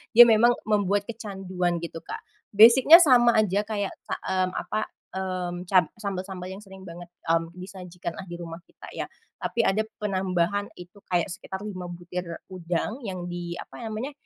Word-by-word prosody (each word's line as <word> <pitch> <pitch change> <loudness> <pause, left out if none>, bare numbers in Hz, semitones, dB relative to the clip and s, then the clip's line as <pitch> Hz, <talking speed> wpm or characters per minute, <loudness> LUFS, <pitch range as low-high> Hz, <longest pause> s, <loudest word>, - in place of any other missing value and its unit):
dia 240 - +12
memang 235 +1 +5
membuat 205 -1 +1
kecanduan 190 -6 -3
gitu, 165 -1 -6
Kak. - - -8 0.3
Basic-nya 265 - +9
sama 240 -4 +5
aja 205 -2 +3
kayak 205 -3 -2 0.2
sa - - -1
mmm, 185 -1 0
apa, 215 - -2 0.3
mmm, 185 -2 -3
cab 185 -5 +5
sambel-sambel 190 -3 -5
yang 190 - -7
sering 190 -2 -13
banget, 175 -1 -9 0.2
mmm, 165 0 +1
disajikan 180 -2 -7
lah 190 - -8
di 170 - -7
rumah 170 -1 -7
kita - - -13
ya. - - -4 0.3
Tapi 235 -1 0
ada 195 +3 +2 0.2
penambahan 190 0 0
itu 180 +3 -13
kayak 175 +1 +1
sekitar 190 0 -7
5 185 -4 -6
butir 175 0 -6 0.2
udang 180 +7 -3
yang 185 -2 -5
di, 175 -1 -5
apa - - -10
namanya, 220 +6 -4
190 Hz, 165 wpm, -26 LUFS, 175-210 Hz, 0.3 s, dia